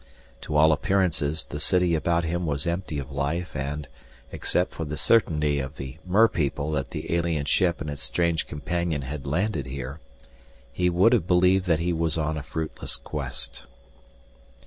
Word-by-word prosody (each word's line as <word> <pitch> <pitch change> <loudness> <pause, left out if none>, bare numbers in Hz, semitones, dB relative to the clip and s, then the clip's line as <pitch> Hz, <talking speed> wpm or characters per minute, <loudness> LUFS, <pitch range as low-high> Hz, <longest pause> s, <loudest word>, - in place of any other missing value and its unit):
To 75 - -4
all 80 +1 +6
appearances 80 -3 +1
the 75 - -6
city 90 +2 +3
about 85 +1 +1
him 85 +1 -1
was 70 0 -1
empty 85 -2 -2
of 70 -2 -5
life 75 +6 -2
and, 70 +2 -3 0.4
except 90 - 0
for 80 - -5
the 75 -1 -4
certainty 75 -7 +3
of 70 +2 -5
the 65 +3 -7
merpeople 85 -7 +2
that 70 -3 -1
the - - -4
alien 85 -4 0
ship 85 +4 +2
and - - -3
its 70 -1 -7
strange 85 +4 0
companion 85 -1 -2
had 70 +1 -6
landed 85 - 0
here, 70 +2 -6 0.7
he 90 +5 +2
would 95 +7 +4
have 100 -8 +2
believed 90 +1 +4
that 85 -2 +4
he 90 +1 +1
was 80 0 0
on 80 0 0
a 75 - -3
fruitless 80 +4 -4
quest. - - -4
80 Hz, 170 wpm, -26 LUFS, 70-90 Hz, 0.7 s, all